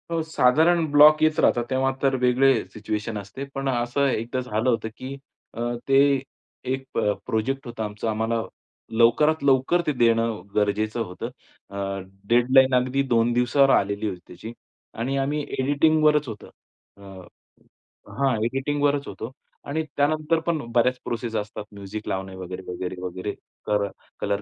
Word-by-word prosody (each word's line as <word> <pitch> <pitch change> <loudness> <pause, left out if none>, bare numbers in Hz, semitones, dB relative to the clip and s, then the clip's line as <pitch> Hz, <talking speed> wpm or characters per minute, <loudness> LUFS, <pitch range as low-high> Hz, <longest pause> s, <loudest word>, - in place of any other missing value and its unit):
हो. 165 -1 0
साधारण 160 +3 +3
ब्लॉक 150 +1 +7
येत 155 0 +3
राहतात. 120 - +3
तेव्हा 135 0 +1
तर 135 -1 +3
वेगळे 130 +2 +4 0.2
सिच्युएशन 110 0 -4
असते. 100 +7 -7
पण 135 0 -1
असं 125 +3 +1
एकदा 120 0 -2
झालं 125 -1 -1
होतं, 115 -2 0
की 135 +2 -7 0.4
अ, 115 - -6 0.3
ते 135 0 +4 0.5
एक 130 0 -2
प - - +2 0.3
प्रोजेक्ट 135 +6 -2
होता 115 -2 -5
आमचा. 105 +1 -4
आम्हाला 110 +1 0 0.6
लवकरात 150 +7 +4
लवकर 135 +5 +3
ते - - +3
देणं 115 -3 +2
गरजेचं 105 +2 0
होतं. 90 -4 -6 0.4
अ, 100 - -8 0.5
डेडलाईन 130 +2 +5
अगदी 130 +2 +1
2 115 -1 +2
दिवसावर 125 +3 +3
आलेली 100 +2 0
होती 90 -2 -6
त्याची 100 +6 -9 0.5
आणि 135 +4 -1
आम्ही 145 +2 0 0.2
एडिटिंगवरच 150 +1 +3
होतं. 105 -3 -8 0.5
अ, - - -18 1.2
हां. 135 -2 +2
एडिटिंगवरच 145 +3 0
होतो. 115 - -7 0.4
आणि 160 +3 -1
त्यानंतर 155 +3 +2
पण 170 -1 +2 0.2
बऱ्याच 125 +1 +3
प्रोसेस 120 -1 -3
असतात. 105 0 -5
म्युझिक 100 +1 -7
लावणे 95 0 -4
वगैरे, 95 0 -7
वगैरे, 90 +1 -4
वगैरे, 90 +3 -4 0.3
तर 105 -1 +1 0.3
कलर 100 0 -1
125 Hz, 145 wpm, -24 LUFS, 110-140 Hz, 1.2 s, ब्लॉक